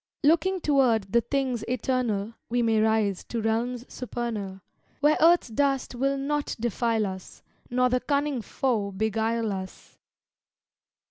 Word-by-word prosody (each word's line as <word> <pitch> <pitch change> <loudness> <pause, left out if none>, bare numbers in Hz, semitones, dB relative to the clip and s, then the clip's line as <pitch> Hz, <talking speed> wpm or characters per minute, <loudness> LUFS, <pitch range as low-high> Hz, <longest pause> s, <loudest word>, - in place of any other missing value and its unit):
Looking 355 +5 +3
toward 245 -10 +2
the 235 - +5
things 260 -2 -1
eternal, 235 -4 -1 0.2
We 240 +1 +1
may 225 -1 +3
rise 215 -3 +1
to 235 - -4
realms 230 +3 -1
supernal, 225 -6 -5 0.4
Where 300 +2 +4
earth's 335 -4 +5
dust 270 +3 0
will 275 +3 0
not 290 +1 -2
defile 230 -1 0
us 190 -1 -8 0.3
Nor 250 +1 +2
the 250 0 +2
cunning 280 -2 0
foe 225 -4 -1
beguile 220 +2 0
us. 190 -1 -8
240 Hz, 130 wpm, -26 LUFS, 220-270 Hz, 0.4 s, the